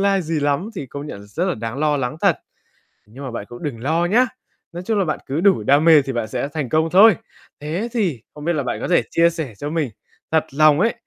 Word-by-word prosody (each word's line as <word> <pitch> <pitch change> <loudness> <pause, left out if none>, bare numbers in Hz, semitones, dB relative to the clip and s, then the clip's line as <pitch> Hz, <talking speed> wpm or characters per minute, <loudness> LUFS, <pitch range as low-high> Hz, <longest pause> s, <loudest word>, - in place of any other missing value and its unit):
lai 195 -1 +2
gì 160 -2 -2
lắm 145 +9 0
thì 145 - -5
công 140 +3 -7
nhận 100 - -8
là 100 - -13
rất 160 - -2
là 185 -2 0
đáng 115 +4 -5
lo 150 -1 +2
lắng 125 +1 -3
thật. - - +3 0.7
Nhưng 125 +7 -11
mà 130 - -5
bạn 110 -3 -5
cũng 120 - -11
đừng 130 -7 -4
lo 160 +5 +1
nhá. 225 +8 +4 0.5
Nói 175 +1 -7
chung 220 0 +1
là 195 - +2
bạn 155 - -2
cứ 140 +5 -2
đủ 190 - +3
đam 140 +7 +4
mê 160 -3 +7
thì 135 0 -5
bạn 120 -2 -2
sẽ 125 - -3
thành 145 -6 -3
công 160 +4 +2
thôi. 195 +3 +7 0.4
Thế 170 +10 -3
thì 175 - -1
không 150 +1 -9
biết 170 - +1
là 145 - -1
bạn - - -3
có - - -2
thể 180 - +4
chia 170 0 +4
sẻ 160 -9 -5
cho 145 - -4
mình 155 -4 -1 0.4
thật 160 -1 +2
lòng 155 +1 +5
ấy, 230 +5 +2
155 Hz, 265 wpm, -21 LUFS, 135-175 Hz, 0.7 s, mê